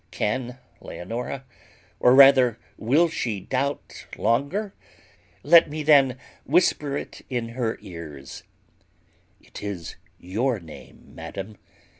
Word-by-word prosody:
Can 125 +3 -3 0.2
Leonora, 120 +8 -6 0.5
or 125 +1 +5
rather 135 -4 +7 0.2
will 145 +10 +2
she, 115 -10 -3
doubt 135 +8 -4
longer? 145 - 0 0.7
Let 165 +2 +6
me 155 +1 -4
then 140 -4 +5 0.3
whisper 150 -3 +1
it - - -8
in 120 -3 -3
her 115 -1 -3
ears 80 -6 -10 1.0
It - - -12
is 100 -5 -6 0.2
your 110 +7 -2
name, 80 -3 -14
madam. 100 +2 -8
125 Hz, 105 wpm, -24 LUFS, 105-140 Hz, 1.0 s, rather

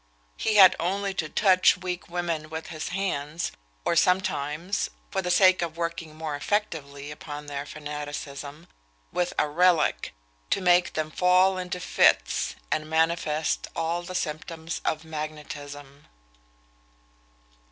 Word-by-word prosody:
He 220 - 0
had 190 -2 +9
only 195 +3 -1
to 160 -4 -2
touch 185 -1 +4
weak 180 -1 -5
women 170 -3 -2
with 160 0 -6
his 155 -2 -5
hands, 170 -4 -2 0.3
or - - +2
sometimes 180 0 +1 0.2
(for 195 -2 0
the 180 - -3
sake 185 0 +5
of 165 -1 -3
working 165 -2 -4
more 155 -2 -4
effectively 145 -6 -2
upon 150 0 -7
their 145 0 -5
fanaticism) 145 0 -6 0.5
with 180 0 0
a 150 - +3
relic, 165 - +2 0.3
to - - +2
make 180 -1 +4
them 155 0 -2
fall 185 +2 +4
into 180 0 -4
fits, 180 - +2 0.2
and 155 0 -1
manifest 160 -1 +1
all 165 +1 -1
the 185 +1 -7
symptoms 160 0 -4
of 155 0 -1
magnetism. 145 -2 -7
165 Hz, 130 wpm, -26 LUFS, 150-180 Hz, 0.5 s, had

